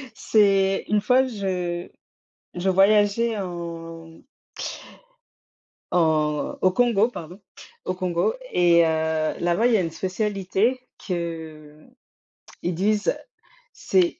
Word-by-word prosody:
c'est 195 -2 +2
une 210 -1 +2
fois, 255 +5 +3
je 180 -6 -3 0.7
je 180 +2 -2
voyageais 205 +4 +3
en 165 -3 -7 1.7
en 155 -3 +1
au 185 - +4
Congo, 225 0 +3
pardon, 175 -3 -9 0.5
au 185 - -2
Congo 180 - 0 0.2
et 170 -1 +4
heu, 160 -1 0
là-bas, 175 +6 +1
il 245 - +4
y - - +5
a - - +1
une 165 - -2
spécialité 195 +6 -1 0.2
qu'ils 160 -4 -6 0.7
disent: 200 +5 0 0.6
«C'est 360 -7 +1
185 Hz, 100 wpm, -24 LUFS, 165-210 Hz, 1.7 s, y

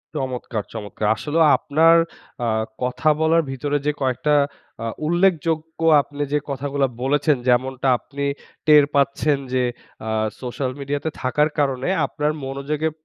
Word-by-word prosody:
চমৎকার, 125 -6 -3
চমৎকার! 105 -1 -4
আসলেও 155 +7 +1
আপনার 165 +3 +4 0.5
আ - - 0 0.4
কথা 125 +5 +1
বলার 160 +1 +4
ভিতরে 145 +2 -1
যে 150 - +3
কয়েকটা 135 +3 +1 0.5
আ - - -3 0.2
উল্লেখযোগ্য 165 -2 +1 0.2
আপনি 145 +1 -8
যে 150 - +3
কথাগুলা 140 0 -1
বলেছেন, 145 +2 +2
যেমনটা 130 +2 +1
আপনি 140 +2 -7 0.4
টের 150 -1 +8
পাচ্ছেন 140 +1 +2 0.2
যে 130 -1 +2 0.4
আ - - -2 0.3
সোশ্যাল 130 +1 -3
মিডিয়াতে 145 +2 -2
থাকার 150 +4 +2
কারণে, 135 -1 0 0.2
আপনার 150 +1 -1
মনোযোগে 140 +3 -2
140 Hz, 130 wpm, -22 LUFS, 130-150 Hz, 0.5 s, টের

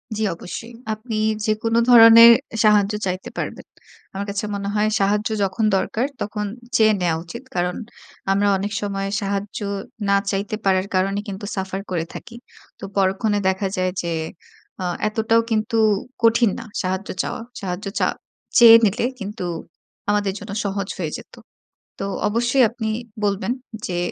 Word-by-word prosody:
জ্বী, 220 - -1
অবশ্যই। 225 +7 -8 0.2
আপনি 215 +1 -5 0.3
যেকোনো 225 +1 0
ধরনের 230 -1 +10 0.2
এ - - -4
সাহায্য 210 -1 +4
চাইতে 185 +5 -3
পারবেন। - - -5 0.5
আমার 195 +1 -4
কাছে 200 +1 -2
মনে 200 0 -3
হয় 210 0 +2
সাহায্য 205 +2 +1
যখন 200 +3 0
দরকার, 220 +5 -1 0.2
তখন 210 0 -3 0.3
চেয়ে 220 -2 +5
নেওয়া 170 -2 +1
উচিত। 235 +9 -9
কারণ 180 0 0 0.6
আমরা 200 +1 +2
অনেক 200 +2 -3
সময় 195 -1 -2
সাহায্য 200 0 -3 0.5
না 200 - +5 0.2
চাইতে 200 +1 -2
পারার 190 0 +2
কারণে 195 +2 +1
কিন্তু 200 +1 -6
সাফার 190 0 -3
করে 165 -2 -1
থাকি। 235 - -9 0.4
তো - - -14
পরক্ষণে 195 +2 +1
দেখা 190 +1 0
যায় 185 0 +1
যে, 170 - -3 0.7
আ - - -2 0.2
এতটাও 225 +1 +2
কিন্তু 220 +2 0 0.5
কঠিন 230 0 +5
না - - -8 0.2
সাহায্য 185 +1 -2
চাওয়া। - - -4 0.2
সাহায্য 185 +1 -4
চা - - +3 0.5
চেয়ে 230 -2 +10
নিলে 215 +4 +1
কিন্তু 205 0 -6 0.7
আমাদের 205 -2 +1
জন্য 205 0 -8
সহজ 200 -1 -2
হয়ে - - -3
যেতো। - - -14 0.6
তো 195 - -2 0.2
অবশ্যই 240 +5 +2
আপনি 225 -1 -4 0.3
বলবেন 205 +3 0 0.4
যে, 175 - -3
205 Hz, 150 wpm, -21 LUFS, 195-220 Hz, 0.7 s, ধরনের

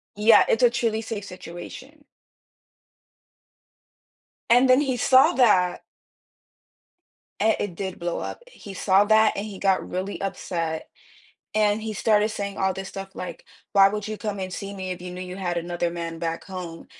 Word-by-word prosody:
Yeah. 210 +2 +6
It's 225 - +2
a 245 - +7
truly 230 -2 -1
safe 215 -2 -5
situation. 200 - -10 2.5
And 245 +2 +5
then 255 +3 +6
he 260 -3 -1
saw 260 +2 +5
that 200 -8 +3 1.6
and 220 0 +3
it 195 -4 -3
did 190 0 -5
blow 175 0 -2
up. - - -6
He 210 - -11
saw 195 +1 +3
that, 220 +1 +4
and 200 - -3
he 200 -3 -8
got 195 -1 +1
really 185 +2 -4
upset. 170 -4 -3 0.7
And 210 0 +2
he 220 -1 -4
started 210 0 +2
saying 200 -2 -5
all 190 0 +1
this 190 0 -6
stuff 195 0 -7
like, 180 - -7 0.3
"Why 195 -1 +7
would 210 0 -4
you 215 0 -4
come 205 -2 -4
and 185 -1 -5
see 200 +1 -6
me 185 -1 -4
if 180 0 -9
you 180 - -6
knew 180 - -7
you 180 0 -6
had 180 -2 -2
another 175 0 -2
man 170 -1 -5
back 165 -1 -3
home?" 180 -3 -8
195 Hz, 170 wpm, -24 LUFS, 180-220 Hz, 2.5 s, a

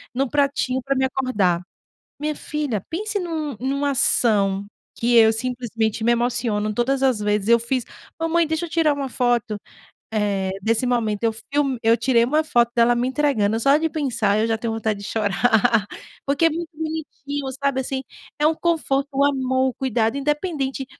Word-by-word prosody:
em 260 - 0
um 275 - 0
pratinho 280 -2 0
para 275 +2 -1
me 265 - +1
acordar. 210 -10 0 0.6
Minha 300 +1 -2
filha, 290 -10 -3
pense 415 +5 -2
numa 315 - -3
numa 280 +2 0
ação 205 -6 +2 0.3
que 240 +1 +1
eu 225 -1 +7
simplesmente 230 -2 -2
me 235 +2 +3
emociono 235 -3 0
todas 265 +3 0
as 260 -5 +2
vezes 210 0 0
eu 235 0 +6
fiz: 235 +1 -1 0.3
"Mamãe, 330 +1 +1
deixa 320 +2 -2
eu 340 - -7
tirar 320 -3 +2
uma 275 -2 -4
foto, 240 -3 0 0.6
eh, 200 -3 0
desse 225 +4 +1
momento, 230 -4 0
eu 225 -1 +2
film 275 +3 -1
eu 225 +1 +4
tirei 235 0 +3
uma 300 +6 +2
foto 240 -6 +2
dela 235 0 +4
me 240 +1 0
entregando", 255 -7 +1
só 275 +5 +4
de 320 +1 0
pensar 230 -9 0
eu 220 - +2
já 225 - +1
tenho 230 0 -2
vontade 220 -2 -2
de 200 - -8
chorar, 220 +1 +2 0.4
porque 285 +4 +2
é - - +6
muito 335 +1 -4
bonitinho, 295 -3 -5 0.2
sabe, 275 -1 +1
assim, 265 0 -4 0.4
é 300 - +2
um 320 - +3
conforto, 305 -5 0
o 275 +1 +3
amor, 260 -2 +1
o - - -7
cuidado, 235 -3 0
independente 290 -2 -2
255 Hz, 180 wpm, -22 LUFS, 225-285 Hz, 0.6 s, eu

